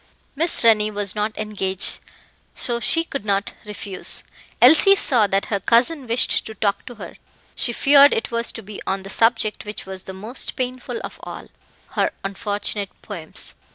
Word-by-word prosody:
Miss 330 Hz, 0 st, +3 dB
Rennie 215 Hz, -2 st, +4 dB
was 205 Hz, -2 st, -1 dB
not 210 Hz, +1 st, -2 dB
engaged, 200 Hz, -3 st, 0 dB, 0.6 s
so 240 Hz, -1 st, -2 dB
she 330 Hz, +8 st, +2 dB
could 275 Hz, -8 st, -6 dB
not 200 Hz, -1 st, -1 dB
refuse. 205 Hz, -2 st, -3 dB, 0.4 s
Elsie 320 Hz, +10 st, +7 dB
saw 240 Hz, -, +3 dB
that 195 Hz, 0 st, 0 dB
her 200 Hz, -, +1 dB
cousin 250 Hz, -, +2 dB
wished 235 Hz, +2 st, +2 dB
to 220 Hz, -, -9 dB
talk 200 Hz, -2 st, -1 dB
to 245 Hz, -, -9 dB
her; -, -, -10 dB, 0.4 s
she 240 Hz, -, 0 dB
feared 280 Hz, +4 st, +6 dB
it 225 Hz, -, -2 dB
was 235 Hz, 0 st, -1 dB
to 225 Hz, -, -7 dB
be 205 Hz, +1 st, -9 dB
on 195 Hz, 0 st, -1 dB
the 195 Hz, -, -9 dB
subject 225 Hz, -1 st, +1 dB
which 210 Hz, 0 st, -7 dB
was 190 Hz, -1 st, -7 dB
the 190 Hz, -, -7 dB
most 215 Hz, +7 st, -4 dB
painful 255 Hz, 0 st, -4 dB
of -, -, -8 dB
all -, -, -9 dB, 0.4 s
her -, -, 0 dB
unfortunate 205 Hz, 0 st, -3 dB
poems. 170 Hz, -7 st, -3 dB
215 Hz, 170 wpm, -21 LUFS, 200-245 Hz, 0.6 s, Elsie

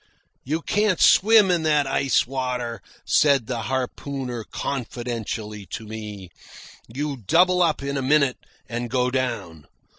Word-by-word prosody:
"You 160 Hz, +5 st, -2 dB
can't 205 Hz, -3 st, +1 dB
swim 210 Hz, -2 st, +6 dB
in 175 Hz, -2 st, +2 dB
that 150 Hz, -2 st, +2 dB
ice 135 Hz, 0 st, +1 dB
water," 125 Hz, -2 st, -3 dB, 0.2 s
said 140 Hz, -5 st, +3 dB
the 120 Hz, -1 st, -3 dB
harpooner 130 Hz, -1 st, -3 dB
confidentially 115 Hz, -5 st, -5 dB
to 110 Hz, -, -5 dB
me. 105 Hz, -4 st, -8 dB, 0.6 s
"You 140 Hz, +4 st, -4 dB
double 180 Hz, -, +3 dB
up 160 Hz, -5 st, +1 dB
in 140 Hz, 0 st, -2 dB
a -, -, -1 dB
minute 140 Hz, -1 st, +2 dB, 0.3 s
and 120 Hz, +2 st, -4 dB
go 125 Hz, 0 st, +1 dB
down. 115 Hz, -, -3 dB
130 Hz, 130 wpm, -23 LUFS, 115-145 Hz, 0.6 s, swim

